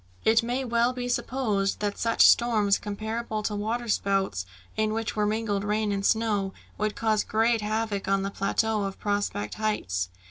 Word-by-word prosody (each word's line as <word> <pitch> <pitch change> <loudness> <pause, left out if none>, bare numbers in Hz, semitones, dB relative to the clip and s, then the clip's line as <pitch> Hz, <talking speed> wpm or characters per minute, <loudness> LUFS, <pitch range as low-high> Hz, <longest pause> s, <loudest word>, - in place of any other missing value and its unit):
It 225 +1 +5
may 245 +3 -2
well 235 +1 +2
be 250 -1 -4
supposed 225 -6 0
that 205 -1 -1
such 230 0 +4
storms, 215 -4 +4
comparable 215 +1 -4
to 210 - -1
water 225 +4 -2
spouts 195 - 0 0.3
in 215 0 +1
which 225 0 -2
were 210 -1 +1
mingled 210 -2 -1
rain 210 0 0
and 200 -1 -1
snow, 205 -3 +1 0.2
would 215 0 -1
cause 220 -2 +1
great 225 +1 +2
havoc 215 -1 -2
on 195 0 +2
the 195 - -2
plateau 215 +2 0
of 195 0 -5
Prospect 205 - -1
Heights. 95 - -1
215 Hz, 170 wpm, -27 LUFS, 200-225 Hz, 0.3 s, It